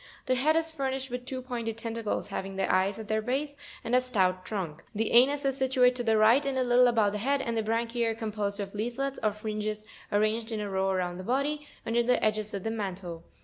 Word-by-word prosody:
The 255 - +2
head 290 +5 +3
is 325 0 +2
furnished 265 -3 -3
with 250 0 -5
two 260 -1 -4
pointed 235 -3 -4
tentacles, 230 -2 -3
having 195 -1 -4
the 190 -1 0
eyes 190 +2 +2
at 220 -1 -7
their 220 0 +1
base, 275 +5 -2 0.3
and 230 +1 -3
a 255 - +5
stout 185 -7 +1
trunk; 170 -6 -4
the 220 +1 0
anus 275 +4 +5
is 270 -1 +1
situate 260 -2 +4
to 245 - -2
the 225 -1 +3
right, 225 +6 +5
and 275 -1 -1
a 260 - +2
Jittle 245 0 +5
above 220 -4 +3
the 210 - -3
head, 275 +6 +1
and 235 -3 -2
the 225 - +1
branchiz 230 +2 0
are 225 - -1
composed 210 -2 -3
of 195 -1 -4
leaflets 245 +6 -2
or 215 - +2
fringes, 215 0 -4 0.3
arranged 215 +2 +1
in 220 - -2
a 205 -1 -4
row 190 0 +1
around 180 -2 -1
the - - -6
body, 285 +6 -1 0.2
under 235 +1 +2
the 245 +1 +2
edges 215 0 0
of 195 - -4
the 225 - -1
mantle. 185 -6 -5
225 Hz, 235 wpm, -29 LUFS, 205-255 Hz, 0.3 s, a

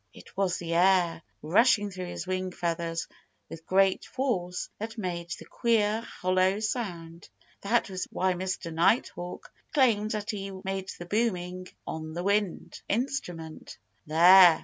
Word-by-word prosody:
It - - -15
was 190 -2 +1
the 170 -1 -4
air, 175 -1 +3 0.2
rushing 205 +4 +4
through 185 -1 -6
his 175 - -5
wing 185 0 -2
feathers 170 -1 -2 0.4
with 165 0 -10
great 190 0 +3
force, 190 -10 -2
that 220 +1 -5
made 175 -4 -4
the - - -6
queer, 220 -2 +1
hollow 185 -2 +1
sound. 175 -7 -4 0.3
That 230 +4 +1
was 185 -2 -4
why 185 0 +1
Mr. 180 -2 -4
Nighthawk 175 0 0 0.2
claimed 225 -7 +3
that 215 0 -2
he 195 -2 -5
made 190 0 -3
the 175 - -7
booming 185 -3 -1 0.2
on 160 +1 -5
a 175 - -2
wind 200 -2 -1
instrument. 180 - -3 0.3
"There!" 175 +1 +8
185 Hz, 140 wpm, -28 LUFS, 175-210 Hz, 0.4 s, There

